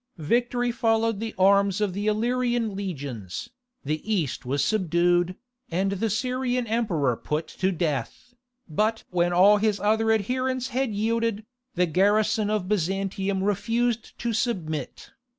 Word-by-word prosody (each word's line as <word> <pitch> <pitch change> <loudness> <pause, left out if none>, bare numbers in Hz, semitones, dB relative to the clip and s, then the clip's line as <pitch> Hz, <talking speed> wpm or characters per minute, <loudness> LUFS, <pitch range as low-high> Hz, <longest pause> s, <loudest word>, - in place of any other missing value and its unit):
Victory 240 +8 0
followed 225 -2 +1
the 225 0 -5
arms 200 +1 +4
of 205 -3 0
the 205 +3 -3
Illyrian 240 0 0
legions, 140 - -5 0.3
the 155 +2 -2
east 155 - -1
was 140 +2 +1
subdued, 175 -2 +2 0.3
and 190 +3 0
the 200 +3 -1
Syrian 250 +3 -1
emperor 195 - 0
put 150 +6 -3
to 190 +1 -1
death. 170 - -3 0.3
But 215 +7 0
when 175 -1 +2
all 195 +4 +6
his 210 -1 +1
other 220 +2 +2
adherents 255 +4 0
had 260 +1 0
yielded, 220 0 -1 0.3
the 180 0 +3
garrison 205 +5 +2
of 210 -4 -1
Byzantium 195 0 -1
refused 230 +3 -1
to 235 -1 -2
submit. 175 - -3
205 Hz, 135 wpm, -25 LUFS, 180-230 Hz, 0.3 s, all